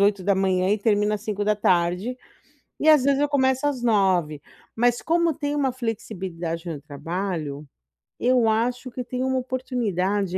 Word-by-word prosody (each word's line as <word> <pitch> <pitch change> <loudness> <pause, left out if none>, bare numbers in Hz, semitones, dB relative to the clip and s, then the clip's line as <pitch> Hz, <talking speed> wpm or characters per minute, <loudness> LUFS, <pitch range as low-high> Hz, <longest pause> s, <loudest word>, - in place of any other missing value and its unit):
8h, 190 -2 +2
e 210 - +2
termino 210 0 +2
às 210 - -4
17h, 205 0 0 0.6
e, 310 - +2
às 300 -4 +6
vezes, 280 0 +3
eu 290 - +2
começo 265 -1 +2
às 275 -4 -1
9. 190 -9 +2 0.3
Mas, 240 +1 +1
como 335 0 +2
tem 290 0 -3
uma 275 -3 +1
flexibilidade 185 -8 -4
no 150 -3 -5
trabalho, 155 -1 -4 0.5
eu 245 -2 +3
acho 240 +4 0
que 250 +1 -5
tem 250 +1 -3
uma 260 0 0
oportunidade 205 -7 -1
215 Hz, 145 wpm, -24 LUFS, 185-255 Hz, 0.6 s, às